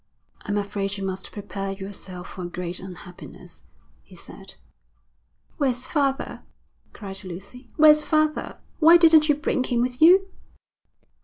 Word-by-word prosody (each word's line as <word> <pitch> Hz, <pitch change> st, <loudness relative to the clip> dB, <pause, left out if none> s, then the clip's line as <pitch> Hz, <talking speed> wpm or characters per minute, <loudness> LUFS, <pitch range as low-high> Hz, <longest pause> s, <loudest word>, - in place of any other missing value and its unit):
'I'm 205 Hz, 0 st, -1 dB
afraid 200 Hz, 0 st, -3 dB
you 195 Hz, -, -4 dB
must 190 Hz, 0 st, -5 dB
prepare 195 Hz, -1 st, -5 dB
yourself 190 Hz, -2 st, -8 dB
for 185 Hz, -, -9 dB
a 175 Hz, -, -4 dB
great 175 Hz, 0 st, -5 dB
unhappiness,' 180 Hz, -1 st, -12 dB, 0.4 s
he -, -, -18 dB
said. -, -, -12 dB, 1.0 s
'Where's 255 Hz, -4 st, -1 dB
father?' 275 Hz, -1 st, -1 dB, 0.5 s
cried 195 Hz, -2 st, -7 dB
Lucy. 200 Hz, +8 st, -10 dB
'Where's 305 Hz, -1 st, +6 dB
father? 310 Hz, -1 st, 0 dB, 0.2 s
Why 335 Hz, +1 st, +8 dB
didn't 320 Hz, -2 st, +5 dB
you 295 Hz, -, +4 dB
bring 290 Hz, -3 st, -1 dB
him 245 Hz, -2 st, -1 dB
with 250 Hz, +2 st, -3 dB
you?' 375 Hz, +4 st, +6 dB
210 Hz, 135 wpm, -24 LUFS, 195-300 Hz, 1.0 s, Why